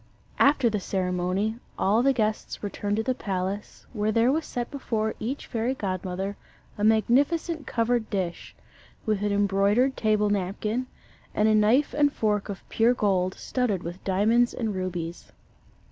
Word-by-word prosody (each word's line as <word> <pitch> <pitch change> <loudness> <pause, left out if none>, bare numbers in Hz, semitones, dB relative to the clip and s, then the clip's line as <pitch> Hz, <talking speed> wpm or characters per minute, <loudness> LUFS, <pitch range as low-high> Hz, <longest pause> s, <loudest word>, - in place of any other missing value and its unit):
After 280 -3 +5
the 215 -2 0
ceremony, 185 +3 -1 0.2
all 210 +4 +3
the 275 +2 +4
guests 215 -5 -2
returned 205 0 -2
to 220 - 0
the 255 - +1
palace, 195 -2 -4
where 215 -1 0
there 230 +3 +3
was 315 +2 -1
set 240 -1 -4
before 220 -6 -2
each 260 +6 -4
fairy 235 +2 -1
godmother 190 -1 -3 0.4
a 205 - -4
magnificent 285 +9 +2
covered 230 -1 0
dish, 185 -4 -3 0.5
with 215 -2 0
an 205 0 0
embroidered 205 +6 +2
table 210 -1 +2
napkin, 210 +5 -1 0.5
and 210 - +3
a 220 - +4
knife 220 +7 +3
and 290 -1 +3
fork 210 -5 0
of 195 -3 -7
pure 235 +2 +3
gold, 185 -4 +1
studded 230 -8 -1
with 175 +3 -7
diamonds 220 +6 +2
and 220 -3 -2
rubies. 175 -3 -4
215 Hz, 150 wpm, -26 LUFS, 195-240 Hz, 0.5 s, After